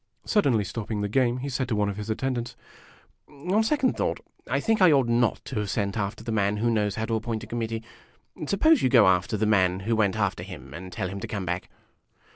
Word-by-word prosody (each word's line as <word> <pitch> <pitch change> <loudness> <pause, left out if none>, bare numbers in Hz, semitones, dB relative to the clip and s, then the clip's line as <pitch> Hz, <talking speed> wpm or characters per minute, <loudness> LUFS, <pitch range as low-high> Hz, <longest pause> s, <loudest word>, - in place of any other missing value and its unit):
Suddenly 135 - +2
stopping 105 0 -4
the 105 - 0
game, 120 +3 +1
he 135 +2 -4
said 130 -1 -2
to 115 - -1
one 105 -1 +1
of 100 0 -3
his 105 +1 -6
attendants: 120 +1 -2 0.7
"On 180 +9 0
second 270 +2 +1
thought, - - -1 0.3
I - - +1
think 225 -2 +1
I 180 -3 +7
ought 135 -4 +4
not 120 -1 +1
to - - -3
have 105 -1 -2
sent 100 0 -1
after 110 +1 -3
the 115 - -4
man 105 -1 +1
who 115 +2 +1
knows 105 -3 0
how 110 - -2
to 115 - -3
appoint 110 0 -2
a - - -6
committee. 115 -1 -3 0.6
Suppose 285 - +4
you 130 - +3
go 120 -5 +6
after 95 +4 +2
the 110 - +1
man 95 -3 +2
who 115 +4 0
went 105 -3 +2
after 100 -5 0
him, 80 -8 -9
and 90 +3 -8
tell 95 - -3
him 100 +2 -6
to - - -5
come 100 -3 -4
back." 90 +1 -3
110 Hz, 235 wpm, -26 LUFS, 100-125 Hz, 0.7 s, I